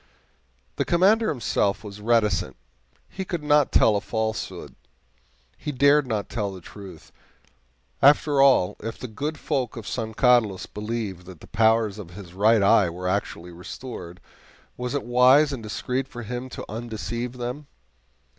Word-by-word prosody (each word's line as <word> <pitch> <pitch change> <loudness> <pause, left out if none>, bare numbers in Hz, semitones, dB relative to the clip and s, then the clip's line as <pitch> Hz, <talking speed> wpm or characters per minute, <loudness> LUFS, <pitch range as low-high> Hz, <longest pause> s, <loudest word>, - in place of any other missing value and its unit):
The - - +1
Commander 205 +6 +3
himself 110 -7 0
was 105 -1 -9
reticent; 105 - +1 0.5
he 190 - -6
could 175 -4 -4
not 150 -1 +3
tell 110 - +4
a 100 - 0
falsehood 110 0 -4 0.9
he 150 - -4
dared 140 +1 +4
not 110 -4 -2
tell 105 -3 -3
the 95 - -9
truth. 90 -2 -12 0.9
After 145 0 +5
all, 115 -8 +4
if 115 +1 -6
the 125 - -7
good 145 +8 -4
folk 130 -6 -2
of 110 -3 -8
San 110 -2 -4
Carlos 120 -7 +3
believed 105 -4 -5
that 90 -4 -11
the - - -13
powers 110 -2 +2
of 95 -5 -8
his 95 -4 -11
right 105 +2 +4
eye 100 -2 +5
were 90 +2 -5
actually 90 -2 -3
restored, 90 0 -9 0.6
was 125 +2 -4
it 140 - -1
wise 130 +5 +5
and 130 - -5
discreet 125 +4 -3
for 120 -4 -8
him 125 +3 -5
to - - -7
undeceive 115 +2 -5
them? 125 +4 -6
115 Hz, 155 wpm, -24 LUFS, 100-130 Hz, 0.9 s, After